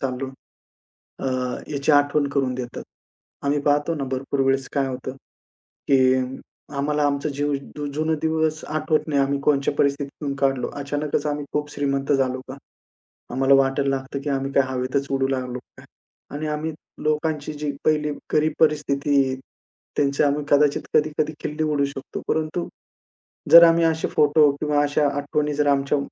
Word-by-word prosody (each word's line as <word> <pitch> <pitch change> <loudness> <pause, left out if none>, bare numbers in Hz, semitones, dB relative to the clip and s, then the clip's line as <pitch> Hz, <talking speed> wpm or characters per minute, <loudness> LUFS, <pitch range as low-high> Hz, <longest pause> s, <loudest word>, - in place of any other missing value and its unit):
चाललो 130 0 -3 0.9
अ, - - -4 0.5
याची 140 +1 +1
आठवण 145 0 +3
करून 135 -2 0
देतात. 125 -1 -6 0.6
आम्ही 145 +1 +2
पाहतो 145 +3 +1
ना 145 - -3
भरपूर 135 +1 -2
वेळेस 135 -1 +1
काय 140 -2 +1
होतं, 130 0 -5 0.8
की 130 -2 +5 0.6
आम्हाला 150 +1 0
आमचं 140 +1 0
जीव 145 0 0 0.4
जुनं 155 +2 0
दिवस 160 -1 0
आठवत 155 0 0
नाही 145 -2 +2
आम्ही 140 +1 0
कोणत्या 140 -1 +2
परिस्थितीतून 140 0 -1
काढलो. 135 -2 0
अचानकच 145 +1 -2
आम्ही 145 0 -2
खूप 150 0 -2
श्रीमंत 140 -1 -1
झालो 130 -2 +1
का. 130 - -6 0.8
आम्हाला 135 +2 +3
वाटायला 135 +1 +2
लागतं 135 +1 -6
की 145 - -1
आम्ही 135 0 -2
काय 135 - +4
हवेतच 130 +2 -1
उडू 135 -1 +1
लागलो 125 -2 -2
की - - -17
काय. - - -17 0.5
आणि 155 - -3
आम्ही 150 +1 -2 0.3
लोकांची 155 0 -1
जी 150 0 -3
पहिली 150 -1 +2 0.2
गरीब 155 +1 +2
परिस्थिती 145 -2 +2
आहे. 130 0 -2 0.6
त्यांची 140 -1 +2
आम्ही 145 0 +1
कदाचित 145 0 +3
कधी-कधी 150 0 +1
खिल्ली 150 +1 -3
उडवू 150 -2 +1
शकतो. 140 -1 -7
परंतु, 160 +2 -1 0.8
जर 170 0 +11
आम्ही 165 0 +5
असे 160 0 +1
फोटो 150 0 +4
किंवा 150 -1 +2
अशा 145 0 +2
आठवणी 150 +1 -1
जर 145 0 +1
आमच्या 140 0 +2
145 Hz, 155 wpm, -23 LUFS, 135-150 Hz, 0.9 s, जर